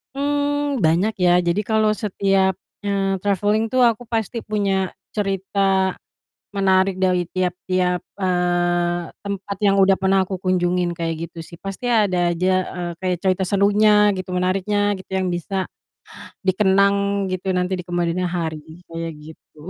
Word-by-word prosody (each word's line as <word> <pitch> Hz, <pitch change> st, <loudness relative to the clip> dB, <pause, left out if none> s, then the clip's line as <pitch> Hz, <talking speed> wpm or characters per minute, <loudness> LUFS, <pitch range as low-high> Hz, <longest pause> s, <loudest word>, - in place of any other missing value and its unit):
Mmm, 290 Hz, 0 st, 0 dB
banyak 175 Hz, +7 st, +2 dB
ya. 180 Hz, -1 st, +4 dB
Jadi 175 Hz, +3 st, 0 dB
kalau 220 Hz, 0 st, +2 dB
setiap, 195 Hz, -2 st, +1 dB, 0.3 s
eee, 195 Hz, -1 st, 0 dB
traveling 205 Hz, +2 st, +1 dB
tuh 255 Hz, -, +3 dB
aku 240 Hz, 0 st, +3 dB
pasti 225 Hz, 0 st, -3 dB
punya 195 Hz, -3 st, 0 dB, 0.2 s
cerita 195 Hz, -1 st, 0 dB, 0.6 s
menarik 190 Hz, -1 st, +2 dB
dari 180 Hz, -1 st, +2 dB
tiap-tiap, 180 Hz, 0 st, -1 dB, 0.2 s
eee, 175 Hz, -2 st, +1 dB, 0.2 s
tempat 200 Hz, 0 st, -4 dB
yang 200 Hz, -1 st, +3 dB
udah 195 Hz, 0 st, +4 dB
pernah 190 Hz, 0 st, +2 dB
aku 190 Hz, 0 st, -4 dB
kunjungin 180 Hz, -1 st, +1 dB
kayak 165 Hz, -1 st, -3 dB
gitu 165 Hz, -, -9 dB
sih. 170 Hz, -, -12 dB
Pasti 195 Hz, +6 st, -7 dB
ada 190 Hz, -7 st, +2 dB
aja, 180 Hz, +2 st, 0 dB, 0.3 s
eee, 175 Hz, -1 st, -3 dB
kayak 185 Hz, -1 st, 0 dB
cerita 190 Hz, 0 st, +2 dB
serunya 205 Hz, +2 st, +4 dB
gitu, 185 Hz, 0 st, -6 dB
menariknya 195 Hz, +3 st, +1 dB
gitu, 190 Hz, -, -14 dB
yang 185 Hz, -1 st, 0 dB
bisa 185 Hz, +2 st, -2 dB, 0.8 s
dikenang 200 Hz, +1 st, +2 dB
gitu 185 Hz, +1 st, -3 dB
nanti 180 Hz, +1 st, 0 dB
di 180 Hz, -, -6 dB
kemudian 175 Hz, 0 st, -1 dB
hari 160 Hz, -1 st, -5 dB
kayak 165 Hz, 0 st, -5 dB
gitu. 155 Hz, +1 st, -13 dB
190 Hz, 140 wpm, -21 LUFS, 180-200 Hz, 0.8 s, ya